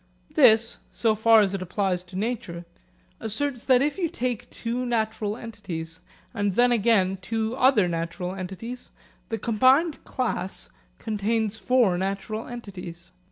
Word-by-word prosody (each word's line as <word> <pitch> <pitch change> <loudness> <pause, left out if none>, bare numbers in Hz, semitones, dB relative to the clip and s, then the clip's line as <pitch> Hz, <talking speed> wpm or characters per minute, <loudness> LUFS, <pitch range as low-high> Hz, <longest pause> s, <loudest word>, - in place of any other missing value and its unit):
This 230 -5 +5
so 225 -2 +1
far 220 +1 +6
as 195 -1 -1
it 195 - -3
applies 185 0 -1
to 180 +1 -13
nature 190 -5 -3 0.5
asserts 245 +3 -3
that 255 -1 +5
if 295 +6 -1
you 340 -3 0
take 250 -8 -3
two 240 +2 -3
natural 220 -3 -1
entities, 180 -8 -7 0.3
and 205 -4 -1
then 245 0 +4
again 200 -5 +2
two 225 +4 -2
other 255 -7 +4
natural 170 +2 -3
entities, 195 +7 -7 0.4
the 225 - -1
combined 260 +9 +3
class 235 -7 -3 0.3
contains 220 0 -1
four 215 -3 +2
natural 200 +4 -3
entities. 185 -8 -9
220 Hz, 135 wpm, -25 LUFS, 190-240 Hz, 0.5 s, far